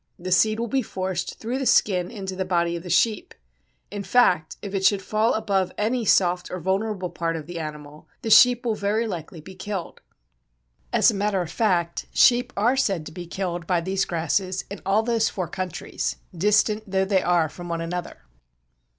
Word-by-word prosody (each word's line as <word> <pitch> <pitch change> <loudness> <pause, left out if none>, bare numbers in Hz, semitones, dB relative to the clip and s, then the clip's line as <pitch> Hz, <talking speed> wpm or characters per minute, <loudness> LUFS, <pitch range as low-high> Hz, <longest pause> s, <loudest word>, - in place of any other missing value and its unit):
The 185 +1 -6
seed 215 +4 +3
will 235 - -1
be 265 +3 0
forced 185 -5 -4
through 240 +4 -3
the 265 - -1
skin 180 -3 +3
into 190 -3 -6
the 190 - -1
body 170 -2 0
of 170 - -5
the 180 - -9
sheep. 215 +5 +1 0.6
In 205 0 -5
fact, 185 -6 +2
if 200 -1 -6
it 195 -1 -1
should 195 0 +3
fall 215 +4 +1
above 200 -4 0
any 230 +3 0
soft 180 -2 +2
or 185 - -5
vulnerable 190 +1 -2
part 165 0 -2
of 155 -2 -6
the 170 +1 -6
animal, 150 -1 -8 0.2
the 225 - -2
sheep 245 +2 +7
will 230 - +1
very 210 +2 0
likely 170 -5 -6
be 190 +5 -11
killed. 190 -1 -6 0.9
As - - +4
a - - -6
matter 200 -1 0
of 160 - -8
fact, 175 -7 0
sheep 245 0 +5
are 235 +6 +3
said 195 -11 0
to 155 - -8
be 175 +1 -8
killed 175 -2 -4
by 180 -2 +2
these 190 +3 -1
grasses 180 +3 -1
in 200 - -7
all 205 +3 +3
those 230 -1 +1
four 185 -3 -4
countries, 185 +1 -4 0.2
distant 210 +3 +2
though 190 0 +1
they 190 -1 +2
are 175 -2 +2
from 175 +3 -9
one 170 0 -2
another. 170 - -5
190 Hz, 195 wpm, -24 LUFS, 175-215 Hz, 0.9 s, sheep